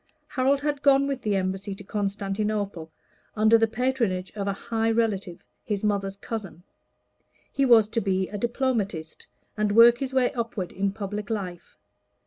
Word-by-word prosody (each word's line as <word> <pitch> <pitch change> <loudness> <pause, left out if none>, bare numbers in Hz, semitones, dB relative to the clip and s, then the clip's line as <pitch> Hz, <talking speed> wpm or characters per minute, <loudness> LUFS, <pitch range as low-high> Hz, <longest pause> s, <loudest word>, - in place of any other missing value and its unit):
Harold 270 +2 +1
had 290 -1 -1
gone 275 -1 +5
with 275 -2 -3
the 210 -3 0
Embassy 190 +1 -2
to 205 - -11
Constantinople, 200 -3 -2 0.5
under 220 +1 +5
the 225 0 +4
patronage 225 -6 -1
of 200 -2 -4
a 200 - +1
high 225 +2 -1
relative, 205 -5 -1 0.2
his 205 -2 -3
mother's 200 -2 0
cousin; 195 -4 -7 0.9
he 275 - +1
was 225 -4 +6
to 225 +1 -1
be 190 -1 0
diplomatist, 220 -9 -2 0.3
and 210 -1 0
work 235 +2 +7
his 270 -1 -3
way 260 -2 +2
upward 230 -6 -3
in 195 +1 -1
public 205 0 -5
life. 185 -6 -5
210 Hz, 150 wpm, -26 LUFS, 195-235 Hz, 0.9 s, work